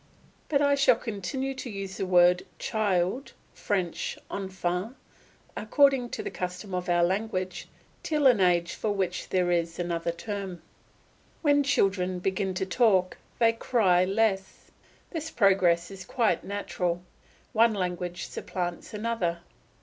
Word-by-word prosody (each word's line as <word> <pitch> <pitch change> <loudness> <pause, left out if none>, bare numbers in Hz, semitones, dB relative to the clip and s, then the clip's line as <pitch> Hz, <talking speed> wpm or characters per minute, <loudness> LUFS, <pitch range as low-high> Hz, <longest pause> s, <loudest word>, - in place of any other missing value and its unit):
But 290 -1 +3
I 285 0 +4
shall 280 -1 +5
continue 255 +5 -4
to 260 -1 -7
use 195 -2 -6
the 190 - -2
word 180 0 +5
child 205 +2 -1 0.2
(French 185 -5 -2
enfant) 190 +3 -3 0.6
according 265 +2 +3
to - - -5
the - - -4
custom 180 +2 -5
of 180 0 -2
our 175 0 +3
language 185 0 -2 0.3
till 300 -2 0
an 250 -5 +6
age 175 -2 +2
for 215 - -2
which 190 -3 -2
there 180 -1 +1
is 170 -1 0
another 170 -1 -1
term. 190 0 -6 0.8
When 290 -1 +4
children 190 -9 +1
begin 190 +1 -1
to 190 - -1
talk 190 -4 +2 0.2
they 230 -1 +4
cry 205 -6 +3
less. 195 -1 -1 0.4
This 320 -2 -4
progress 190 - +3
is 190 -1 -8
quite 230 +2 0
natural; 180 -3 -2 0.5
one 225 0 +4
language 180 -2 -3
supplants 175 +3 -5
another. 205 -6 -1
190 Hz, 135 wpm, -27 LUFS, 180-225 Hz, 0.8 s, an